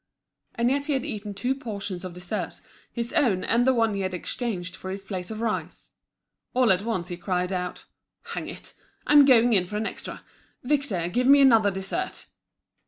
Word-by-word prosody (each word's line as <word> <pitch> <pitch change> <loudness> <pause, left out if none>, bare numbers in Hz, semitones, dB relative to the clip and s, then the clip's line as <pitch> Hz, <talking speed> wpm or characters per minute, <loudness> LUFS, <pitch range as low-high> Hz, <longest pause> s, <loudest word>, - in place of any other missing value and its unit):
And 235 +2 +2
yet 285 +2 0
he 300 - +1
had 265 0 -1
eaten 210 -7 -5
two 245 +7 0
portions 200 -8 -5
of 180 -2 -7
dessert, 180 0 -4 0.3
his 235 +1 -4
own 245 - +2
and 240 +2 +2
the 260 - +5
one 225 -2 +2
he 200 - -2
had 185 -1 -2
exchanged 185 -2 -3
for 190 - -8
his 195 +1 -5
plate 185 -3 -5
of 220 0 -5
rice. 225 -2 -4 0.6
All 250 -4 +4
at 185 0 +3
once 200 -5 -3
he 175 - -5
cried 180 0 -1
out: 180 -1 -4 0.5
"Hang - - -4
it, - - -9 0.3
I'm 290 -1 +7
going 245 -3 +5
in 185 -3 +3
for 210 - -4
an 215 - -1
extra! - - -6 0.4
Victor, 250 - 0
give 245 +8 0
me 280 +1 +8
another 225 -7 +6
dessert!" 195 - -4
215 Hz, 190 wpm, -26 LUFS, 185-250 Hz, 0.6 s, me